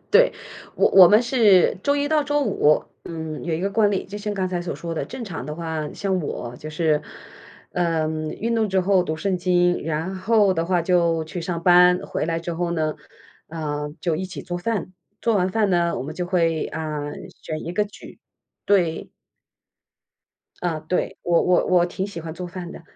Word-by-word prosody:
对， - - +5 0.4
我 - - +3
我 185 -3 +9
们 215 +3 +5
是 215 -8 +4
周 285 - +3
一 285 0 0
到 310 -1 +3
周 290 0 +1
五。 150 - +2 0.2
嗯， 160 -2 -6
有 165 -2 -1
一 165 - -3
个 200 +1 -1
惯 210 0 +3
例， 195 - -1
就 205 +2 -7
像 210 0 -3
刚 185 -1 -1
才 180 -1 -2
所 175 - -4
说 170 -1 -6
的， 160 - -2
正 260 -2 -8
常 160 - -6
的 150 - -5
话 160 -2 -4
像 190 -2 -1
我 125 -5 -5
就 155 0 -8
是 155 -1 +1 0.7
呃， 165 -3 0 0.4
运 230 +2 0
动 220 -2 +1
之 190 0 +2
后 185 -1 +3
读 155 - -3
圣 185 +2 -1
经， 175 -1 +2
然 165 +4 -2
后 205 0 +3
的 165 -1 -1
话 175 -1 +1
就 170 -2 +2
去 170 +3 -6
上 170 0 -3
班， 180 0 +6
回 - - -2
来 165 0 -1
之 170 0 -4
后 170 +1 -2
呢。 155 -2 -1 0.5
呃， 150 -2 -4
就 170 -3 0
一 190 - -3
起 185 - -7
做 175 -2 -4
饭， 190 0 -2 0.3
做 230 -2 +2
完 185 -1 +2
饭 210 0 +1
呢， 170 -1 +1
我 - - -3
们 150 +3 -6
就 180 -1 -2
会， 165 -3 +1
嗯， 150 -2 -5
选 155 0 -7
一 170 - -4
个 210 +3 +1
举。 205 - -13 0.5
对。 175 -5 +1 1.5
啊， 170 -3 -1
对， 180 - -2
我 170 -1 +3
我 180 -1 +3
我 180 -1 +4
挺 190 +2 -4
喜 185 -5 -7
欢 160 0 -6
做 180 0 -6
饭 175 0 -7
的。 - - -10
175 Hz, 215 characters per minute, -23 LUFS, 160-195 Hz, 1.5 s, 我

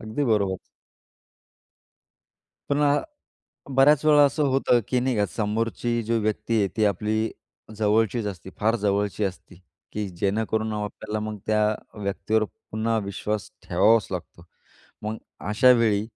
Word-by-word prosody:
अगदी 110 +6 -2
बरोबर. 100 -5 +1 2.1
पुन्हा 145 0 +2 0.7
बऱ्याच 140 +2 +5
वेळा 150 -1 +7
असं 145 +2 0
होतं, 130 -2 +3
की 125 - +1
नाही 125 -1 0
का 105 - +2
समोरची 115 +3 -1
जी 115 +1 0
व्यक्ती 110 +2 -1
आहे 100 - +2
ती 110 - +3
आपली 110 +2 0 0.4
जवळचीच 110 +2 +1
असते, 95 -2 -7
फार 110 +2 +2
जवळची 100 -1 0
असती 95 -1 -6 0.3
की 105 -1 -2
जेणेकरून 110 +4 -1
आपल्याला 105 +1 -4
मग 105 - -6
त्या 105 0 +3 0.4
व्यक्तीवर 110 +2 0 0.3
पुन्हा 110 +1 0
विश्वास 105 +2 -3 0.2
ठेवावाच 105 +5 +4
लागतो. 85 -1 -7 0.6
मग 110 +1 -3 0.3
अशावेळी 115 -2 +4
110 Hz, 125 wpm, -25 LUFS, 105-115 Hz, 2.1 s, वेळा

